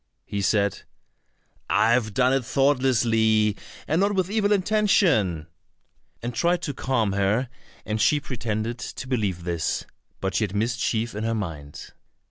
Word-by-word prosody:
He 100 Hz, -, -3 dB
said, 100 Hz, 0 st, +1 dB, 0.9 s
"I 115 Hz, -, +3 dB
have 110 Hz, -4 st, +1 dB
done 130 Hz, 0 st, +3 dB
it 135 Hz, -1 st, +1 dB
thoughtlessly, 115 Hz, -6 st, +2 dB, 0.3 s
and 160 Hz, +4 st, +1 dB
not 200 Hz, +1 st, +2 dB
with 185 Hz, 0 st, 0 dB
evil 210 Hz, -1 st, +1 dB
intention," 185 Hz, -, +2 dB, 0.8 s
and 120 Hz, +1 st, -3 dB
tried 175 Hz, +6 st, +1 dB
to 145 Hz, -, -2 dB
calm 120 Hz, -6 st, 0 dB
her, 100 Hz, +6 st, +1 dB, 0.4 s
and 110 Hz, 0 st, -2 dB
she 150 Hz, -, +4 dB
pretended 115 Hz, -3 st, -3 dB
to 130 Hz, -, -7 dB
believe 105 Hz, -9 st, -1 dB
this; 85 Hz, -2 st, -2 dB, 0.3 s
but 95 Hz, -1 st, -2 dB
she 95 Hz, -, +1 dB
had 100 Hz, -1 st, -3 dB
mischief 115 Hz, +1 st, -1 dB
in 105 Hz, +1 st, -4 dB
her 115 Hz, 0 st, 0 dB
mind. 80 Hz, -8 st, -6 dB
115 Hz, 145 wpm, -24 LUFS, 105-135 Hz, 0.9 s, she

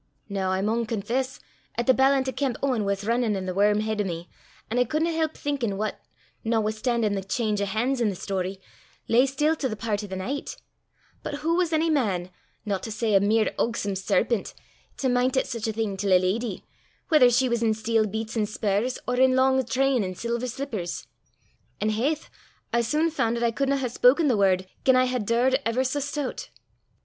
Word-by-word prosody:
Noo 195 Hz, -2 st, -2 dB
I 190 Hz, 0 st, 0 dB
maun 225 Hz, +2 st, 0 dB
confess 240 Hz, +5 st, -2 dB, 0.4 s
'at 235 Hz, -, -1 dB
the 260 Hz, -, +6 dB
ballant 265 Hz, 0 st, +3 dB
o' -, -, 0 dB
Kemp 260 Hz, -3 st, -1 dB
Owen 250 Hz, -6 st, +1 dB
was 200 Hz, 0 st, -1 dB
rinnin' 230 Hz, -2 st, +1 dB
i' -, -, -3 dB
the 185 Hz, -, -3 dB
worm 205 Hz, +2 st, +3 dB
heid 215 Hz, -1 st, -1 dB
o' -, -, +1 dB
me, 170 Hz, -2 st, -5 dB, 0.4 s
an' 245 Hz, -, +1 dB
I -, -, +5 dB
cudna 310 Hz, +7 st, 0 dB
help 315 Hz, -1 st, -1 dB
thinkin' 255 Hz, -9 st, -2 dB
what, 215 Hz, +1 st, -3 dB, 0.4 s
notwithstan'in' 220 Hz, 0 st, 0 dB
the 195 Hz, -, -1 dB
cheenge 210 Hz, +1 st, -1 dB
o' -, -, +1 dB
han's 245 Hz, +6 st, 0 dB
i' -, -, +3 dB
the 195 Hz, -, -3 dB
story, 190 Hz, 0 st, -3 dB, 0.5 s
lay 245 Hz, +4 st, +4 dB
still 295 Hz, +4 st, +1 dB
to 265 Hz, -, -1 dB
the 215 Hz, -, -3 dB
pairt 210 Hz, -1 st, -2 dB
o' -, -, -6 dB
the 190 Hz, -, -5 dB
knicht; 250 Hz, +10 st, -4 dB, 0.6 s
but -, -, -4 dB
hoo 315 Hz, +3 st, -1 dB
was 355 Hz, -2 st, +1 dB
ony 320 Hz, +1 st, +2 dB
man, 190 Hz, -, 0 dB, 0.3 s
no 200 Hz, -2 st, -1 dB
to 225 Hz, -, -7 dB
say 215 Hz, 0 st, -1 dB
a 195 Hz, -, +7 dB
mere 215 Hz, +2 st, +2 dB
ugsome 205 Hz, -4 st, -1 dB
serpent, 195 Hz, +3 st, 0 dB, 0.4 s
to 265 Hz, -, 0 dB
mint 250 Hz, +1 st, +2 dB
at -, -, +2 dB
sic 230 Hz, -2 st, -4 dB
a -, -, 0 dB
thing 215 Hz, -2 st, -2 dB
till 195 Hz, 0 st, +1 dB
a -, -, +8 dB
leddy, 195 Hz, +3 st, -2 dB, 0.4 s
whether 300 Hz, -6 st, +6 dB
she 255 Hz, +2 st, +3 dB
was 235 Hz, -1 st, 0 dB
in 220 Hz, -2 st, +2 dB
steel 220 Hz, 0 st, +1 dB
beets 220 Hz, +2 st, -4 dB
an' 215 Hz, -2 st, +1 dB
spurs 215 Hz, +3 st, -1 dB
or 250 Hz, 0 st, 0 dB
in 260 Hz, 0 st, +5 dB
lang 265 Hz, 0 st, +3 dB
train 260 Hz, -1 st, +2 dB
an' 185 Hz, -1 st, -4 dB
silver 235 Hz, +4 st, -2 dB
slippers? 230 Hz, -9 st, -4 dB, 0.7 s
An' 215 Hz, -, +1 dB
haith! 280 Hz, +8 st, -1 dB, 0.5 s
I 235 Hz, -, +3 dB
sune 310 Hz, +7 st, +1 dB
fan' 235 Hz, -6 st, 0 dB
'at 235 Hz, -, -2 dB
I 235 Hz, -, +3 dB
cudna 275 Hz, +3 st, 0 dB
hae 265 Hz, -2 st, -1 dB
spoken 265 Hz, +6 st, +4 dB
the 245 Hz, -, +3 dB
word, 190 Hz, -2 st, +2 dB, 0.2 s
gien 260 Hz, -1 st, +5 dB
I 255 Hz, 0 st, +4 dB
had 250 Hz, -5 st, -2 dB
daured 255 Hz, +3 st, +3 dB
ever 230 Hz, +3 st, +1 dB
sae 265 Hz, +3 st, -1 dB
stoot. 285 Hz, -1 st, -4 dB
230 Hz, 210 wpm, -25 LUFS, 205-260 Hz, 0.7 s, a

